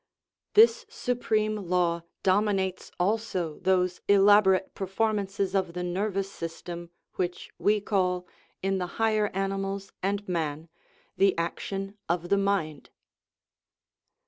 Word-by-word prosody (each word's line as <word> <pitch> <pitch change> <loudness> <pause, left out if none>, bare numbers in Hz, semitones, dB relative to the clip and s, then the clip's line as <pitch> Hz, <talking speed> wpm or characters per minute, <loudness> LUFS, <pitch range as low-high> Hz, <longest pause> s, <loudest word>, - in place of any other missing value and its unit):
This 460 +2 +6
supreme 230 - 0
law 175 -3 0 0.2
dominates 190 -1 +1
also 185 -5 -1
those 180 -1 +1
elaborate 200 -1 +5
performances 195 -1 -1
of 190 -3 0
the 180 0 -3
nervous 195 +2 -1
system 170 0 -7 0.3
which 175 -1 -3
we 210 +1 +3
call, 180 -3 0 0.4
in 195 0 +1
the 180 - -2
higher 215 -2 +2
ani 195 0 -2
mals 195 0 -4
and 200 +2 -1
man, 160 -2 -2 0.5
"the 195 -2 +4
action 195 +4 -3
of 175 0 -1
the 200 - +4
mind." 195 -7 -1
195 Hz, 115 wpm, -28 LUFS, 180-205 Hz, 0.5 s, This